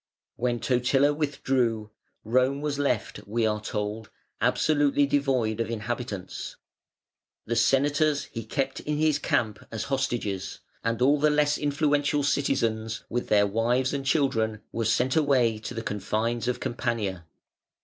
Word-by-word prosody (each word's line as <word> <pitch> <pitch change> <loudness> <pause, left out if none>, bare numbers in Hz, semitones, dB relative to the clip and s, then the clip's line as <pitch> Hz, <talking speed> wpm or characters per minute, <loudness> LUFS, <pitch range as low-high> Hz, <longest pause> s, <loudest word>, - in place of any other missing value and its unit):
When 120 -1 -1
Totila 135 +4 +2
withdrew 130 -7 -1 0.3
Rome 130 +5 +2
was 145 -1 -2
left, 130 -6 -1
we 115 +2 0
are 105 -1 0
told, 105 +1 -4 0.3
absolutely 145 -2 +3
devoid 130 -6 +1
of 115 - -1
inhabitants. 110 -4 -4 0.9
The 115 - -1
Senators 145 +4 +2
he 115 - -5
kept 135 +4 -2
in 150 0 -2
his 155 -1 +2
camp 110 -6 0
as 110 -1 -3
hostages, 120 -8 -2 0.3
and 115 +1 0
all 145 +3 +4
the 150 +1 +4
less 150 0 +3
influential 145 0 +1
citizens 115 -6 0
with 120 +1 -2
their 105 -1 +4
wives 120 +6 +1
and 140 -1 -2
children 115 -7 +1
were 115 -1 -2
sent 125 +4 +2
away 130 -8 +3
to 115 +3 -7
the 115 - -4
confines 110 +4 -2
of 125 - -1
Campania. 115 -8 -2
125 Hz, 140 wpm, -27 LUFS, 110-140 Hz, 0.9 s, all